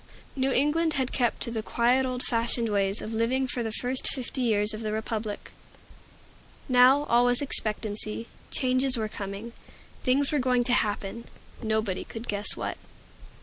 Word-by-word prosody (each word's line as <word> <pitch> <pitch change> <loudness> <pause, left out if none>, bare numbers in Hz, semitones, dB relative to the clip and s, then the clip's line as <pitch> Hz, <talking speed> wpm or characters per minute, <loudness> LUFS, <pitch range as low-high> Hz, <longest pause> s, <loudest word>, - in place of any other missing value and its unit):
New 265 0 +1
England 310 +5 +2
had 260 -3 0
kept 240 -3 0
to 235 - -1
the 225 -1 -2
quiet 245 +4 +2
old 250 -1 -3
fashioned 230 -1 0
ways 200 -1 0
of 220 - -5
living 250 +4 +1
for 245 - -3
the 225 -1 -2
first 250 +3 -1
fifty 260 0 -2
years 215 -3 +1
of 215 - -5
the 215 -1 -2
Republic. 215 -1 -4 1.2
Now 255 +2 +6
all 240 -3 +3
was 245 0 +3
expectancy. 215 -4 -2 0.2
Changes 255 0 +2
were 220 -1 -1
coming. 205 +3 -6 0.5
Things 275 +3 +4
were 300 - +1
going 250 -1 +2
to 245 - +1
happen, 210 +1 -1 0.4
nobody 220 -4 -1
could 225 +1 -8
guess 205 0 +1
what. - - -4
235 Hz, 160 wpm, -27 LUFS, 215-255 Hz, 1.2 s, Now